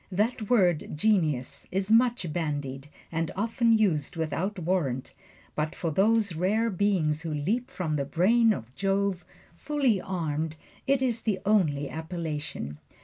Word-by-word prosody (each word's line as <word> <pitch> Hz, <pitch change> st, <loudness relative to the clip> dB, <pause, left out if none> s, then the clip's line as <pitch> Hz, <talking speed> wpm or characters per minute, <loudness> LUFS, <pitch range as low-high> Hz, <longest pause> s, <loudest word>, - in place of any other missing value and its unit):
That 215 Hz, +2 st, 0 dB
word 180 Hz, -10 st, +2 dB
"genius" 155 Hz, -, +1 dB
is 195 Hz, +2 st, -1 dB
much 230 Hz, -8 st, +3 dB
bandied, 145 Hz, -4 st, -3 dB, 0.2 s
and 165 Hz, -1 st, -1 dB
often 230 Hz, +2 st, +2 dB
used 165 Hz, -10 st, +1 dB
without 165 Hz, +5 st, -2 dB
warrant; 160 Hz, -8 st, -1 dB, 0.4 s
but 155 Hz, 0 st, -2 dB
for 165 Hz, -, -2 dB
those 205 Hz, +3 st, +3 dB
rare 210 Hz, +7 st, +1 dB
beings 180 Hz, -6 st, +1 dB
who 165 Hz, -1 st, -4 dB
leap 205 Hz, -, -1 dB
from 155 Hz, -5 st, -2 dB
the 140 Hz, -, -1 dB
brain 220 Hz, -, +4 dB
of 125 Hz, -, -4 dB
Jove, 195 Hz, +1 st, 0 dB, 0.3 s
full 290 Hz, -, -1 dB, 0.2 s
armed, 160 Hz, -4 st, -2 dB, 0.3 s
it 270 Hz, -1 st, +3 dB
is 235 Hz, -3 st, 0 dB
the 210 Hz, -4 st, 0 dB
only 155 Hz, -9 st, +2 dB
appellation. 155 Hz, -, -5 dB
180 Hz, 140 wpm, -28 LUFS, 150-215 Hz, 0.4 s, brain